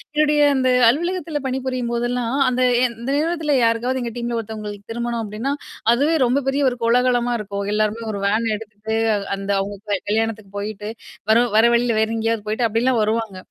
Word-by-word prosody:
என்னுடைய 300 -1 +3
அந்த 260 -1 +2 0.2
அலுவலகத்தில 340 +1 -1
பணிபுரியும்போதெல்லாம், 250 -1 -2
அந்த 255 0 -1 0.2
எ - - +3 0.2
இந்த 240 - -4
நேரத்தில 315 -2 0
யாருக்காவது 240 +3 +1
எங்க 235 -1 -3
டீம்ல 240 -1 -2
ஒருத்தவங்களுக்கு 210 -1 -7
திருமணம் 235 0 -2
அப்டின்னா, 220 +7 -3 0.4
அதுவே 290 +7 +2
ரொம்ப 260 +3 +1
பெரிய 275 +2 +1
ஒரு 245 - -6
கோலாகலமா 245 +1 +2
இருக்கும். 200 -1 -4
எல்லாருமே 215 +2 0
ஒரு 200 - -4
வேன் 220 +3 +1
எடுத்துட்டு 215 +1 -6 0.4
அந்த 195 +1 -3
அவங்க 200 +1 -4
க 200 - +1
கல்யாணத்துக்கு 220 -2 -1
போயிட்டு 210 0 -5 0.4
வரும் 235 +1 +4
வர 225 - +6
வழியில 235 -1 +1
வேற 220 - +2
எங்கேயாவது 225 -1 -1
போய்ட்டு 225 +2 +1
அப்டில்லாம் 230 +2 +1
வருவாங்க. 220 -2 -1
235 Hz, 165 wpm, -21 LUFS, 215-255 Hz, 0.4 s, வர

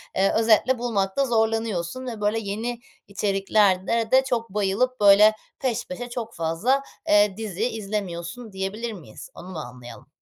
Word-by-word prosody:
eee, 195 +1 +3
özetle 225 +3 +4
bulmakta 225 +1 0
zorlanıyorsun 225 -2 -1
ve, 225 -4 -6
böyle, 210 +2 +1
yeni 225 +3 -4 0.3
içeriklerde 200 +1 +1
de 260 0 +6
çok 235 -4 -2
bayılıp, 210 +6 0
böyle, 205 +1 +8 0.3
peş 245 -4 -2
peşe, 245 -3 -6
çok 235 -2 -6
fazla, 170 +12 +1 0.3
eee, 205 -1 +4
dizi 220 +1 -2
izlemiyorsun 205 0 -5
diyebilir 200 +4 -4
miyiz? 155 - -11
Onu 180 - -11
mu 175 - -6
anlayalım? 125 -3 -10
210 Hz, 140 wpm, -24 LUFS, 195-235 Hz, 0.3 s, böyle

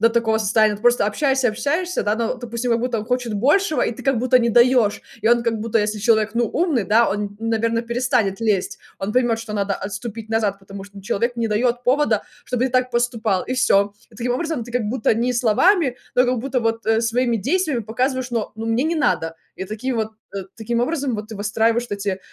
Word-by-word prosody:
до 230 - +5
такого 225 -1 +1
состояния. 215 0 +3
Ты 205 - -11
просто 240 -3 +4
общаешься, 265 +3 +1
общаешься, 320 +11 -1
да, 210 +1 0
ну, 235 +2 -1
допустим, 240 0 -4
как 230 - +1
будто 245 -2 -1
он 210 - -4
хочет 245 -1 -1
большего, 305 - +2
и - - -1
ты - - -10
как 270 -3 +1
будто 255 +2 +4
не 235 - +1
даешь. 240 -2 +4 0.2
И 220 - +3
он 240 0 +4
как 225 -2 0
будто, 230 0 0
если 210 0 -1
человек, 220 0 +2
ну, 235 0 +2
умный, 305 - 0
да, 225 +4 +4
он, 205 0 -3
наверно, 230 0 0
перестанет 235 -4 0
лезть. 210 -5 0 0.2
Он 200 +2 -3
поймет, 240 -3 +2
что 225 -1 -7
надо 200 -1 -1
отступить 215 +2 -6
назад, 215 -3 0
потому 195 0 -10
что 200 0 -12
человек 235 +4 -1
не 230 -1 0
дает 240 +3 0
повода, 250 -5 +2 0.2
чтобы 250 0 -1
ты 260 - -4
так 255 0 +2
поступал, 235 -5 0
и 255 - -3
всё. 200 -6 +3 0.2
И 215 - -18
таким 245 +2 -1
образом 315 -2 -2
ты 240 - -11
как 245 -2 0
будто 225 -1 +1
не 240 +3 0
словами, 255 - +3 0.2
но 250 - +6
как 250 0 0
будто 255 +2 -1
бы 225 0 +2
вот 225 +1 +1
своими 235 +1 +1
действиями 295 - 0
показываешь: 250 +4 -2
"Но 225 -3 -2
ну, 225 +1 -5
мне 225 +3 +1
не 325 +2 0
надо". 165 - 0 0.2
И 190 - -4
таким 225 +6 -3
вот 220 -1 -1 0.3
э, 195 - -3
таким 235 +1 -2
образом 270 -1 -1
вот 210 0 -5
ты 220 - -8
выстраиваешь 225 +3 +1
вот - - -7
эти 200 -2 -2
230 Hz, 225 wpm, -21 LUFS, 215-250 Hz, 0.3 s, но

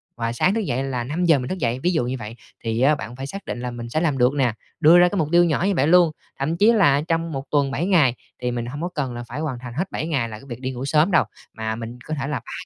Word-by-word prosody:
và 115 0 -2
sáng 180 +10 +2
thức 225 - +1
dậy 130 - -1
là 130 -3 -2
5:00 160 +3 +2
mình 125 - -4
thức 190 - -2
dậy, 120 -2 0
ví 175 +6 +1
dụ 140 -7 +1
như 125 - -2
vậy, 110 +1 -7 0.3
thì 115 +1 -1
á 150 +3 +5
bạn 120 -3 -7
phải 135 +1 -6
xác 195 +6 -8
định - - -4
là 125 - -3
mình 120 -1 -7
sẽ 155 +6 0
làm 150 -6 +1
được 125 +2 +3
nè, 130 -5 +2 0.3
đưa 165 +2 +7
ra 180 - +6
cái 200 - -3
mục 155 - +1
tiêu 175 0 +6
nhỏ 165 0 0
như 200 - +2
vậy 145 -1 +2
luôn. 175 -2 +5 0.3
Thậm 155 +5 -1
chí 210 +5 +5
là 145 -10 +4
trong 165 +1 -1
một 135 -1 -4
tuần 140 -2 +2
7 150 +6 -1
ngày 155 -11 +4 0.3
thì 125 0 -1
mình 120 -1 -3
hông 145 +6 -6
có 175 - -2
cần 130 -5 -2
phải 125 +6 -6
hoàn 150 -6 -3
thành 120 -1 -8
hết 180 +9 -3
7 155 - -3
ngày 135 -8 -1
là 110 -1 -8
cái - - -15
việc 120 +2 -7
đi 130 - -2
ngủ 130 +1 -5
sớm 155 +6 +3
đâu, - - +5 0.3
mà 110 0 -3
mình 115 +2 -7
có 155 - -4
thể 135 -2 -3
là 145 -2 -2
3 - - -12
135 Hz, 315 wpm, -22 LUFS, 120-165 Hz, 0.3 s, đưa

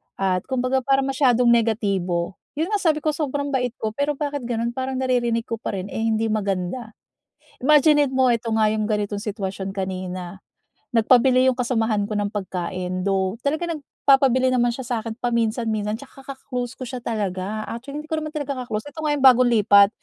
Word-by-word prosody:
At 185 -2 0
kumbaga 260 0 0
parang 270 +1 +1
masyadong 250 -3 +3
negatibo. 195 -6 0 0.2
Yun 320 +7 -2
nga, 415 - +1
sabi 315 -5 +1
ko 310 - +2
sobrang 285 -1 -2
bait 250 -3 -1
ko, 220 - -3
pero 285 +5 -1
bakit 285 -3 -3
gano'n? 235 0 -1
Parang 260 +2 -3
naririnig 245 -3 0
ko 230 -2 -5
pa 210 - -4
rin, 190 +1 -5
eh, - - -4
hindi 225 0 0
maganda. 205 +2 -2 0.6
Imaginin 295 0 +4
mo, 260 -1 +4
eto 230 -1 0
nga 215 -1 +3
yung 215 0 -1
ganitong 210 -1 -1
sitwasyon 195 -2 -4
kanina. 185 -1 -5 0.6
Nagpabili 255 +3 +5
yung 255 - -1
kasamahan 225 -4 0
ko 215 - -5
ng 205 -1 -1
pagkain, 185 -2 -4
though 190 0 0
talaga 305 +5 -1
nagpapabili 270 -5 +2
naman 240 -1 +3
siya 240 +2 -5
sa'kin 230 -2 -3
paminsan 235 -1 0
minsan, 210 0 -2
tsaka 270 +2 -14
ka-close 265 -2 -6
ko 255 - -6
siya 250 0 -6
talaga 210 -1 -3
actually 260 +5 -7
hindi 300 - -6
ko 315 0 -2
naman 310 - -4
talaga 285 -4 -4
ka-close, 220 -3 -4
ito 315 - -7
nga 305 - 0
yung 270 - +1
bagong 255 -1 +7
lipat. 200 -1 +6
235 Hz, 185 wpm, -23 LUFS, 210-265 Hz, 0.6 s, bagong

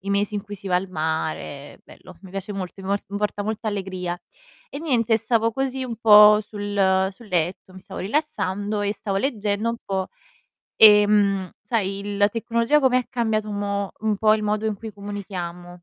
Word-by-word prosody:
i 200 0 -5
mesi 200 +1 0
in 205 - -2
cui 205 0 -8
si 195 - -11
va 180 - 0
al 190 +2 -2
mare. 155 -3 -4
Bello, 185 - -15
mi 190 - -12
piace 195 +1 -5
molto, 195 -1 -6
mi 190 - -7
po 200 0 0
mi 200 +1 -4
porta 205 0 -2
molta 220 +1 -3
allegria. 185 -3 -4 0.5
E 280 - -7
niente, 235 -8 +2
stavo 225 +1 +1
così 265 +1 -2
un 235 -3 -5
po' 210 -1 +8
sul 200 -2 0
sul 230 +4 -16
letto, 180 +1 -2
mi 185 - -11
stavo - - -9
rilassando 205 -5 -2
e 205 0 0
stavo 200 -2 -4
leggendo 215 -3 -1
un 235 - -4
po', 190 -1 -2 0.7
ehm, 205 -3 +5
sai, 205 -1 -2
la 205 0 +4
tecnologia 230 +5 +1
come 260 -2 +4
ha 250 - -4
cambiato 220 -4 -1
un 205 - -4
mo 200 -1 -2
un 215 -1 0
po' 215 +1 +4
il 215 - -2
modo 210 +1 0
in 215 -2 -1
cui 220 +1 -8
comunichiamo. 180 -4 -7
205 Hz, 195 wpm, -23 LUFS, 190-220 Hz, 0.7 s, po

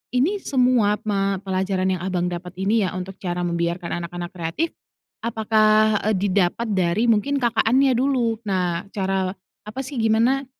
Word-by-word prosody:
ini 315 +12 +2
semua 250 - +2
ma 195 -1 +1
pelajaran 190 -1 -1
yang 175 - -7
Abang 180 -2 -1
dapat 180 +1 -6
ini 210 +3 +2
ya, - - -2
untuk 185 +1 -6
cara 180 -1 -3
membiarkan 170 0 -2
anak-anak 175 0 -6
kreatif. 175 - -2 0.5
Apakah, 215 -1 +3
eee, 215 - +2
didapat 195 +3 +1
dari 185 +4 +1
mungkin 255 +6 +2
kakaknya 245 +3 +3
dulu? 245 -4 +1
Nah, 180 -3 -1
cara 190 -1 -1 0.3
apa 215 +5 -7
sih, 270 0 -7
gimana, 230 +5 +2
205 Hz, 145 wpm, -22 LUFS, 185-230 Hz, 0.5 s, Apakah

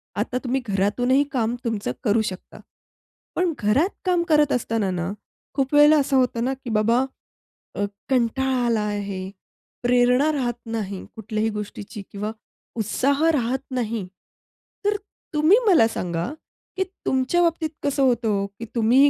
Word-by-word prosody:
आता 250 - -1
तुम्ही 265 +1 0
घरातूनही 230 +8 +2
काम 235 -2 0
तुमचं 220 - -2
करू 215 +2 +3
शकता. 195 -4 -6 0.8
पण 350 -1 +1
घरात 235 - +2 0.2
काम 355 -2 +2
करत 300 -2 +4
असताना 225 -4 0
ना 180 +1 -2 0.4
खूप 270 0 -1
वेळेला 295 +1 +7
असं 275 -1 +2
होतं 245 -2 +1
ना 265 - 0
की 245 - -5
बाबा 230 +4 +3 0.7
अ, 205 - -1 0.3
कंटाळा 260 0 +1
आला 230 -2 +2
आहे, 200 -2 -3 0.5
प्रेरणा 250 +4 +4
राहत 250 -4 0 0.2
नाही 200 -4 -4
कुठल्याही 220 0 -1
गोष्टीची 210 -1 -6
किंवा 210 +2 -3 0.5
उत्साह 275 +7 +1
राहत 260 -3 0
नाही. 230 -5 -2 0.8
तर 415 0 +3 0.4
तुम्ही 310 +7 +5
मला 330 - +6
सांगा 170 -6 -3 0.5
की 380 - +2 0.2
तुमच्या 265 +7 +2
बाबतीत 330 -2 +1
कसं 285 -1 +1
होतं 240 -3 +2
हो 200 -1 +1
की 200 +3 -9
तुम्ही 245 +5 +5
240 Hz, 140 wpm, -23 LUFS, 210-275 Hz, 0.8 s, वेळेला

